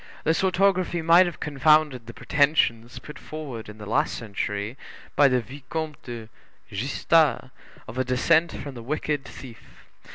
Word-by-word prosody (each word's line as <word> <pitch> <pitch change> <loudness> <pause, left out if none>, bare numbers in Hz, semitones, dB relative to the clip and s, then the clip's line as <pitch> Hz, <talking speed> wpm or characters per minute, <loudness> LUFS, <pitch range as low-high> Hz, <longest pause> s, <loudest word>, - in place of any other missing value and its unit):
This 160 +4 +1
orthography 185 -2 +2
might 170 +3 +6
have 175 - -6
confounded 150 -4 +2
the 115 - -8
pretensions 140 -6 +1
put 150 - -10
forward 140 -9 -7
in 105 - -11
the 105 - -9
last 135 +9 0
century 105 0 -4 0.4
by 145 - +6
the 125 -2 +2
Vicomte 145 +5 -6
de 115 -3 -8 0.4
Gestas, 140 +4 +1 0.4
of 125 - -6
a - - +3
descent 155 +7 +2
from 140 - -7
the 120 - -9
wicked 145 +2 -2
thief. 120 -4 -13
140 Hz, 150 wpm, -25 LUFS, 120-155 Hz, 0.4 s, might